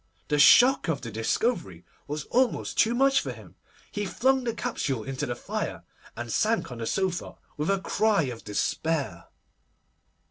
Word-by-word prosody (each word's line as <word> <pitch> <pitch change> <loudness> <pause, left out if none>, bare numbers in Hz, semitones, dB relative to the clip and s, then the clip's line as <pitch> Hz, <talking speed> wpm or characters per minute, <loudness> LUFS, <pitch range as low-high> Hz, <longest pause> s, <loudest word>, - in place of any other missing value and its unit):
The 150 -1 +1
shock 250 - +7
of 160 -4 -1
the 115 - -6
discovery 115 - -1 0.2
was 150 0 -4
almost 255 0 +1
too 230 +1 +3
much 270 +2 +4
for - - -4
him. - - -13 0.4
He 205 - -3
flung 260 +6 +1
the 235 - -1
capsule 130 - -2
into 135 +1 -4
the 120 - -3
fire, - - -4 0.3
and 120 0 -5
sank 220 - +1
on 120 - -7
the 115 - -3
sofa 190 -2 -2 0.2
with 150 +4 -2
a 195 0 +2
cry 215 -3 +2
of 125 -4 -5
despair. 110 - -2
160 Hz, 165 wpm, -27 LUFS, -, 0.4 s, shock